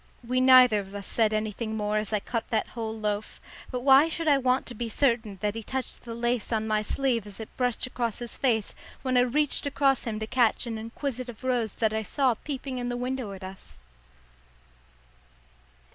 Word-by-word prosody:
We 255 Hz, +1 st, +1 dB
neither 255 Hz, -4 st, +7 dB
of 195 Hz, 0 st, -8 dB
us 200 Hz, -1 st, -6 dB
said 220 Hz, +1 st, +2 dB
anything 215 Hz, +1 st, -2 dB
more 210 Hz, 0 st, 0 dB
as 215 Hz, -1 st, -4 dB
I 210 Hz, -, +1 dB
cut 230 Hz, +3 st, -4 dB
that 220 Hz, -2 st, 0 dB
whole 225 Hz, -2 st, -5 dB
loaf; 210 Hz, 0 st, -2 dB, 0.3 s
but 250 Hz, -1 st, -3 dB
why 270 Hz, +3 st, +7 dB
should 330 Hz, 0 st, -3 dB
I 285 Hz, -2 st, +5 dB
want 255 Hz, 0 st, +1 dB
to 245 Hz, -, -6 dB
be 235 Hz, +1 st, -4 dB
certain 230 Hz, -5 st, +1 dB
that 210 Hz, -1 st, 0 dB
he 225 Hz, -, -5 dB
touched 260 Hz, +4 st, -5 dB
the 230 Hz, -1 st, -6 dB
lace 240 Hz, 0 st, -1 dB
on 220 Hz, -1 st, 0 dB
my 215 Hz, -1 st, +2 dB
sleeve 235 Hz, -1 st, 0 dB
as 205 Hz, 0 st, -9 dB
it 220 Hz, -, -9 dB
brushed 250 Hz, 0 st, 0 dB, 0.3 s
his 240 Hz, -1 st, -5 dB
face 225 Hz, -6 st, +1 dB, 0.3 s
when 255 Hz, -1 st, 0 dB
I -, -, +6 dB
reached 285 Hz, +3 st, +1 dB
across 275 Hz, -2 st, +2 dB
him 225 Hz, -2 st, -2 dB
to 220 Hz, -, -3 dB
catch 240 Hz, 0 st, +2 dB
an 225 Hz, -2 st, -4 dB
inquisitive 245 Hz, +1 st, -5 dB
rose 245 Hz, -5 st, 0 dB
that 220 Hz, -2 st, +1 dB
I 220 Hz, -, 0 dB
saw 260 Hz, +3 st, +1 dB
peeping 265 Hz, +1 st, -5 dB
in 245 Hz, 0 st, -2 dB
the 245 Hz, -, -2 dB
window 250 Hz, -3 st, -3 dB
at 190 Hz, 0 st, -10 dB
us? 190 Hz, -, -9 dB
235 Hz, 200 wpm, -27 LUFS, 215-255 Hz, 0.3 s, neither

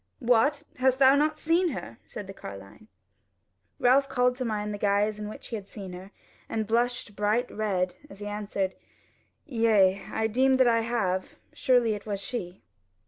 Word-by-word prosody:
"What! 275 Hz, +4 st, +2 dB
hast 260 Hz, 0 st, +3 dB
thou 265 Hz, 0 st, +7 dB
not 300 Hz, +2 st, +2 dB
seen 335 Hz, +3 st, +2 dB
her?" 115 Hz, -, -7 dB
said 205 Hz, -, -7 dB
the 195 Hz, -, -9 dB
carline. 100 Hz, -, -11 dB, 0.9 s
Ralph 270 Hz, +3 st, +4 dB
called 250 Hz, -1 st, +2 dB
to 255 Hz, -, -2 dB
mind 210 Hz, -2 st, -2 dB
the 205 Hz, -, -6 dB
guise 205 Hz, +1 st, +1 dB
in 210 Hz, 0 st, -5 dB
which -, -, -10 dB
he 230 Hz, -, -3 dB
had 200 Hz, -3 st, -7 dB
seen 195 Hz, -3 st, -8 dB
her 185 Hz, +2 st, -9 dB, 0.4 s
and 220 Hz, -2 st, -2 dB
flushed 235 Hz, -2 st, 0 dB
bright 215 Hz, +4 st, 0 dB
red, 185 Hz, -4 st, -1 dB, 0.2 s
as 200 Hz, -, -13 dB
he 205 Hz, -, -6 dB
answered: 205 Hz, -2 st, -2 dB, 0.7 s
"Yea, 215 Hz, -, +3 dB
I 220 Hz, -, 0 dB
deem 260 Hz, +4 st, +3 dB
that 260 Hz, -1 st, +5 dB
I 230 Hz, -1 st, +4 dB
have: 215 Hz, -5 st, -1 dB, 0.2 s
surely 245 Hz, -4 st, +3 dB
it 205 Hz, 0 st, -7 dB
was 200 Hz, -2 st, -2 dB
she." 190 Hz, -4 st, -6 dB
215 Hz, 175 wpm, -27 LUFS, 200-250 Hz, 0.9 s, thou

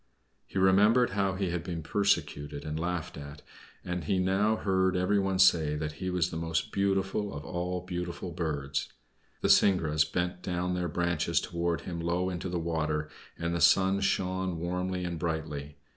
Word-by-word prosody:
He -, -, -6 dB
remembered 105 Hz, +6 st, +5 dB
how 95 Hz, -1 st, 0 dB
he 95 Hz, -2 st, -1 dB
had 85 Hz, -1 st, -2 dB
been 85 Hz, -3 st, -4 dB
persecuted 75 Hz, -8 st, 0 dB
and 75 Hz, 0 st, -3 dB
laughed 90 Hz, -1 st, -3 dB
at, 70 Hz, +1 st, -10 dB, 0.4 s
and 90 Hz, -3 st, -3 dB
he 95 Hz, -, +1 dB
now 95 Hz, +4 st, +2 dB
heard 95 Hz, -3 st, +1 dB
everyone 95 Hz, +1 st, +1 dB
say 85 Hz, -5 st, +5 dB
that 75 Hz, 0 st, -3 dB
he 95 Hz, -, -1 dB
was 90 Hz, -2 st, 0 dB
the 80 Hz, -, -4 dB
most 80 Hz, -1 st, -1 dB
beautiful 100 Hz, +1 st, 0 dB
of 70 Hz, +1 st, -7 dB
all 90 Hz, 0 st, -3 dB
beautiful 90 Hz, 0 st, -5 dB
birds. 75 Hz, -5 st, -2 dB, 0.5 s
The -, -, +1 dB
syringas 80 Hz, -6 st, +4 dB
bent 90 Hz, +2 st, -2 dB
down 90 Hz, 0 st, -2 dB
their 90 Hz, -1 st, -1 dB
branches 85 Hz, +1 st, +1 dB
toward 85 Hz, -1 st, -2 dB
him 85 Hz, -2 st, -5 dB
low 90 Hz, +2 st, 0 dB
into 90 Hz, +1 st, -4 dB
the 90 Hz, -, -2 dB
water, 80 Hz, -2 st, -1 dB, 0.3 s
and 85 Hz, 0 st, -2 dB
the 85 Hz, -, -1 dB
sun 95 Hz, +5 st, +5 dB
shone 95 Hz, -2 st, 0 dB
warmly 90 Hz, +2 st, -2 dB
and 85 Hz, -2 st, -3 dB
brightly. 75 Hz, -3 st, -4 dB
90 Hz, 170 wpm, -29 LUFS, 80-95 Hz, 0.5 s, remembered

